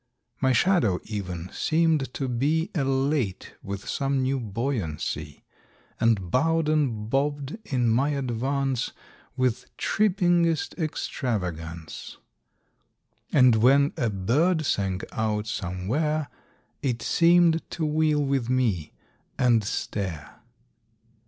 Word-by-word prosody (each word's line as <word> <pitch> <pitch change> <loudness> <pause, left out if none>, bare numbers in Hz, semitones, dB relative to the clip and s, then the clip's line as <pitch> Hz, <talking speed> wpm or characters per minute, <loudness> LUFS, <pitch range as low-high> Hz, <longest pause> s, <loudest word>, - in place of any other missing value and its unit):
My 130 -1 +3
shadow 125 - +3
even 95 -4 -5
seemed 160 -4 +1
to 135 - -2
be 145 +7 0
Elate 135 - 0
with 100 0 -6
some 135 -1 0
new 135 +1 0
buoyancy, 100 - -3 0.6
And 100 -7 +1
bowed 165 +4 +2
and 130 -9 0
bobbed 145 - -1
in 125 - 0
my 125 +6 +2
advance 135 -1 -1 0.4
With 130 -3 0
trippingest 175 -5 +2
extravagance, 90 - -4 1.1
And 125 -3 +5
when 140 +5 +4
a 120 - 0
bird 150 - +1
sang 95 -6 0
out 110 -1 -1
somewhere, 115 - -2 0.5
It 125 -5 -1
seemed 170 -1 +4
to 160 - -2
wheel 150 -1 +2
with 135 -3 0
me, 110 -12 0 0.4
and 120 -3 +3
stare. 95 -5 -4
130 Hz, 100 wpm, -26 LUFS, 105-150 Hz, 1.1 s, And